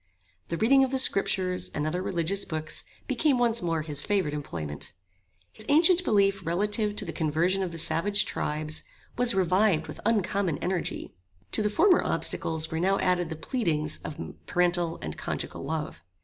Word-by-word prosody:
The 170 Hz, -, -3 dB
reading 270 Hz, +7 st, +5 dB
of 265 Hz, -, +1 dB
the 265 Hz, -, 0 dB
scriptures, 190 Hz, -6 st, +1 dB
and 150 Hz, -, -1 dB
other 170 Hz, +4 st, -1 dB
religious 185 Hz, +1 st, -1 dB
books, 155 Hz, -1 st, -4 dB, 0.2 s
became 270 Hz, +1 st, +2 dB
once 235 Hz, -1 st, +2 dB
more 165 Hz, -2 st, -1 dB
his 150 Hz, -2 st, -3 dB
favorite 190 Hz, -7 st, 0 dB
employment. 85 Hz, -, -5 dB, 0.6 s
His 215 Hz, -, -7 dB
ancient 340 Hz, +5 st, +5 dB
belief 195 Hz, -, +2 dB
relative 210 Hz, +5 st, 0 dB
to -, -, -2 dB
the -, -, -5 dB
conversion 170 Hz, +4 st, +1 dB
of 185 Hz, -2 st, -2 dB
the 165 Hz, -, -7 dB
savage 170 Hz, +6 st, +2 dB
tribes, 155 Hz, +1 st, -2 dB, 0.3 s
was 245 Hz, -3 st, +5 dB
revived 185 Hz, -3 st, +2 dB
with 155 Hz, -, -9 dB
uncommon 200 Hz, -6 st, +1 dB
energy. 180 Hz, +1 st, -3 dB, 0.4 s
To -, -, +1 dB
the 210 Hz, -, +1 dB
former 360 Hz, -, +4 dB
obstacles 160 Hz, -1 st, -1 dB
were 160 Hz, -, -1 dB
now 195 Hz, +3 st, +2 dB
added 180 Hz, -2 st, +1 dB
the 160 Hz, -, -4 dB
pleadings 160 Hz, -, -1 dB
of 155 Hz, -, -8 dB, 0.3 s
parental 175 Hz, -2 st, +1 dB
and 75 Hz, 0 st, -5 dB
conjugal -, -, -4 dB
love. 155 Hz, -, -4 dB
180 Hz, 165 wpm, -27 LUFS, 160-210 Hz, 0.6 s, reading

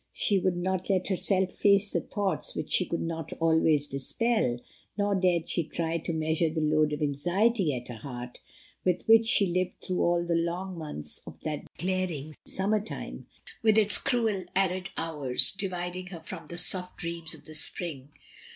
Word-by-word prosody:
She 200 Hz, -3 st, +2 dB
would 180 Hz, -1 st, 0 dB
not 185 Hz, +1 st, -2 dB
let 190 Hz, -1 st, +1 dB
herself 190 Hz, 0 st, +1 dB
face 200 Hz, 0 st, +3 dB
the -, -, 0 dB
thoughts 195 Hz, -6 st, -3 dB
which -, -, -4 dB
she 180 Hz, -, +2 dB
could 170 Hz, -, -2 dB
not 165 Hz, -2 st, -4 dB
always 160 Hz, -3 st, +2 dB
dispel, 140 Hz, -, 0 dB, 0.4 s
nor 205 Hz, 0 st, +1 dB
dared 180 Hz, -3 st, +2 dB
she 170 Hz, -, 0 dB
try 165 Hz, +1 st, -2 dB
to 165 Hz, -, -4 dB
measure 160 Hz, +1 st, +1 dB
the 160 Hz, +1 st, -3 dB
load 155 Hz, 0 st, +2 dB
of 150 Hz, 0 st, -2 dB
anxiety 175 Hz, +7 st, +1 dB
at 125 Hz, 0 st, -6 dB
her 120 Hz, -, -7 dB
heart, 125 Hz, -1 st, -7 dB, 0.4 s
with 180 Hz, -1 st, +1 dB
which 225 Hz, 0 st, +6 dB
she 205 Hz, -, +4 dB
lived 180 Hz, 0 st, -1 dB
through 185 Hz, -, -2 dB
all 175 Hz, 0 st, +2 dB
the 170 Hz, -, 0 dB
long 175 Hz, +3 st, -1 dB
months 150 Hz, -, -5 dB
of -, -, -10 dB
that 150 Hz, -1 st, -4 dB
glaring 175 Hz, -4 st, -2 dB
summer 205 Hz, +2 st, 0 dB
time, 220 Hz, -, -7 dB, 0.3 s
with 220 Hz, -1 st, +4 dB
its 210 Hz, -1 st, +7 dB
cruel, 220 Hz, -7 st, 0 dB
arid 185 Hz, -1 st, +1 dB
hoius 150 Hz, -2 st, +4 dB
dividing 185 Hz, -2 st, -3 dB
her 175 Hz, -3 st, -8 dB
from 165 Hz, -1 st, -9 dB
the 170 Hz, -, -7 dB
soft 180 Hz, +1 st, +2 dB
dreams 170 Hz, -1 st, -3 dB
of -, -, -17 dB
the 155 Hz, -, -10 dB
spring. 155 Hz, -3 st, -2 dB
175 Hz, 180 wpm, -28 LUFS, 155-190 Hz, 0.4 s, its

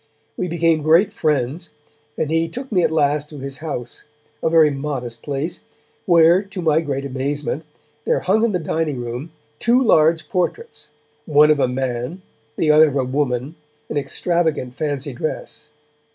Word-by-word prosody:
We 180 Hz, -, -2 dB
became 165 Hz, -2 st, +1 dB
great 170 Hz, +7 st, +4 dB
friends, 150 Hz, -, -1 dB, 0.4 s
and 155 Hz, -, -1 dB
he 165 Hz, 0 st, +1 dB
took 255 Hz, +8 st, -7 dB
me 185 Hz, -4 st, +3 dB
at -, -, +2 dB
last 150 Hz, -1 st, +1 dB
to 150 Hz, -, -10 dB
his 135 Hz, 0 st, -7 dB
house, 145 Hz, -6 st, -6 dB, 0.4 s
a -, -, +1 dB
very 160 Hz, -2 st, +5 dB
modest 135 Hz, -5 st, -5 dB
place, 145 Hz, +5 st, -4 dB, 0.4 s
where 170 Hz, +1 st, +6 dB
to 195 Hz, -1 st, -9 dB
my 160 Hz, -2 st, +2 dB
great 140 Hz, -3 st, -3 dB
amazement, 140 Hz, +3 st, -3 dB, 0.4 s
there -, -, +1 dB
hung 210 Hz, +5 st, +2 dB
in 230 Hz, -, +2 dB
the 185 Hz, -, +1 dB
dining 160 Hz, -4 st, -2 dB
room, 120 Hz, +6 st, -5 dB, 0.3 s
two 240 Hz, +2 st, +3 dB
large 160 Hz, -9 st, +3 dB
portraits, 300 Hz, -, -3 dB, 0.4 s
one 150 Hz, 0 st, +5 dB
of 150 Hz, -, +2 dB
a 135 Hz, -, +3 dB
man, 125 Hz, +6 st, -3 dB, 0.3 s
the 155 Hz, -, +2 dB
other 155 Hz, +1 st, +7 dB
of 145 Hz, -, -3 dB
a 135 Hz, -, +1 dB
woman, 130 Hz, +1 st, -1 dB, 0.4 s
in -, -, -2 dB
extravagant 155 Hz, -1 st, -1 dB
fancy 145 Hz, -1 st, -3 dB
dress. 150 Hz, +2 st, -5 dB
150 Hz, 165 wpm, -20 LUFS, 140-165 Hz, 0.4 s, other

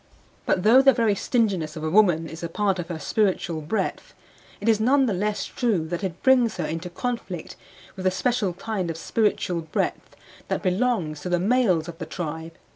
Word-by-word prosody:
But 180 Hz, -, +1 dB
though 240 Hz, +5 st, +7 dB
the 270 Hz, 0 st, +6 dB
very 225 Hz, -3 st, +2 dB
stinginess 195 Hz, -8 st, 0 dB
of 155 Hz, -, -6 dB
a 160 Hz, -, 0 dB
woman 175 Hz, -5 st, +4 dB
is 160 Hz, +1 st, -9 dB
a 170 Hz, -, -4 dB
part 195 Hz, +1 st, 0 dB
of 170 Hz, -, -4 dB
her 170 Hz, -2 st, -4 dB
spiritual 175 Hz, -2 st, 0 dB
breadth, 160 Hz, +9 st, -3 dB, 0.4 s
it 205 Hz, -, -5 dB
is 220 Hz, -2 st, +4 dB
none 265 Hz, +5 st, +4 dB
the 225 Hz, -, 0 dB
less 205 Hz, +2 st, -1 dB
true 215 Hz, -10 st, 0 dB
that 175 Hz, +3 st, -3 dB
it 180 Hz, -3 st, -4 dB
brings 255 Hz, -4 st, +4 dB
her -, -, -1 dB
into 165 Hz, +3 st, -4 dB
conflict 190 Hz, -4 st, -5 dB, 0.4 s
with 190 Hz, -1 st, -7 dB
the -, -, +5 dB
special 210 Hz, 0 st, 0 dB
kind 190 Hz, -1 st, -3 dB
of 165 Hz, -, -4 dB
spiritual 180 Hz, -2 st, 0 dB
breadth 160 Hz, -1 st, -3 dB, 0.3 s
that -, -, -2 dB
belongs 185 Hz, -6 st, 0 dB
to 180 Hz, -, -4 dB
the 175 Hz, -1 st, +2 dB
males 190 Hz, -6 st, +2 dB
of 170 Hz, -1 st, -9 dB
the 165 Hz, -, -5 dB
tribe. 160 Hz, -1 st, -5 dB
185 Hz, 200 wpm, -24 LUFS, 165-225 Hz, 0.4 s, though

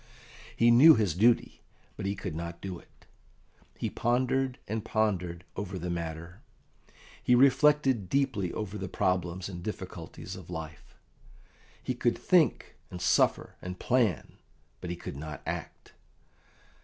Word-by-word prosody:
He 120 Hz, +1 st, +5 dB
knew 150 Hz, +7 st, +9 dB
his 105 Hz, -7 st, +1 dB
duty, 115 Hz, +7 st, +2 dB, 0.3 s
but 95 Hz, -, -4 dB
he 100 Hz, -, -1 dB
could 95 Hz, -3 st, -5 dB
not 85 Hz, +1 st, -6 dB
do 95 Hz, -3 st, -6 dB
it. -, -, -24 dB, 0.7 s
He -, -, -2 dB
pondered 130 Hz, +2 st, 0 dB
and 110 Hz, +1 st, -3 dB
pondered 90 Hz, -7 st, -1 dB
over 100 Hz, -1 st, -4 dB
the 90 Hz, 0 st, -4 dB
matter, 85 Hz, +1 st, -5 dB, 0.8 s
he 125 Hz, -, +4 dB
reflected 135 Hz, -, +4 dB
deeply 130 Hz, -10 st, 0 dB
over 105 Hz, -1 st, -5 dB
the 95 Hz, -, -4 dB
problems 90 Hz, 0 st, -1 dB
and 90 Hz, -3 st, -7 dB
difficulties 90 Hz, -4 st, -7 dB
of -, -, -11 dB
life; 80 Hz, -2 st, -8 dB, 0.9 s
he -, -, -1 dB
could -, -, 0 dB
think, -, -, +2 dB
and 90 Hz, -, -7 dB
suffer, -, -, +2 dB
and 90 Hz, 0 st, -6 dB
plan, 115 Hz, -, 0 dB, 0.4 s
but 90 Hz, -, -6 dB
he 90 Hz, -, -2 dB
could 85 Hz, -, -8 dB
not 75 Hz, +1 st, -7 dB
act. -, -, -6 dB
95 Hz, 140 wpm, -29 LUFS, 85-120 Hz, 0.9 s, knew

